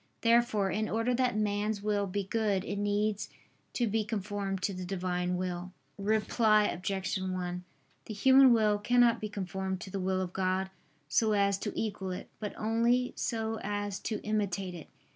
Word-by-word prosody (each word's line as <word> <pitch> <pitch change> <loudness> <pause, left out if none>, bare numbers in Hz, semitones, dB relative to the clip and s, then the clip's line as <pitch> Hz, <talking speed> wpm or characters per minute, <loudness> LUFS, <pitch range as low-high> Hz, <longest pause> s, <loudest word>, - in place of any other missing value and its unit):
Therefore, 230 -4 +3
in 215 +4 -1
order 225 +3 +1
that 250 -2 +1
man's 210 0 -1
will 205 -1 0
be 200 +2 -2
good 200 -1 0
it 200 - -3
needs 205 +1 0 0.4
to 240 - +1
be 220 0 0
conformed 200 -2 -3
to 200 - 0
the 185 0 -5
Divine 180 -1 -1
will. 180 0 -4 0.3
Reply 215 +1 +3
Obj. 190 +1 -2
1: 180 -1 -3 0.4
The 215 - -6
human 265 +4 +7
will 215 -3 +3
cannot 240 +1 +3
be 215 - -3
conformed 190 -1 -3
to 190 - -8
the 195 - -3
will 185 0 0
of 185 -1 -3
God 190 0 0 0.4
so 215 +8 +2
as 200 -1 +2
to 210 - -3
equal 200 -3 -3
it, 180 - -6
but 210 -2 -5
only 235 +3 +1
so 225 -1 -2
as 205 -1 -3
to 215 - -3
imitate 195 -3 -1
it. 170 -3 -9
205 Hz, 170 wpm, -31 LUFS, 190-220 Hz, 0.4 s, human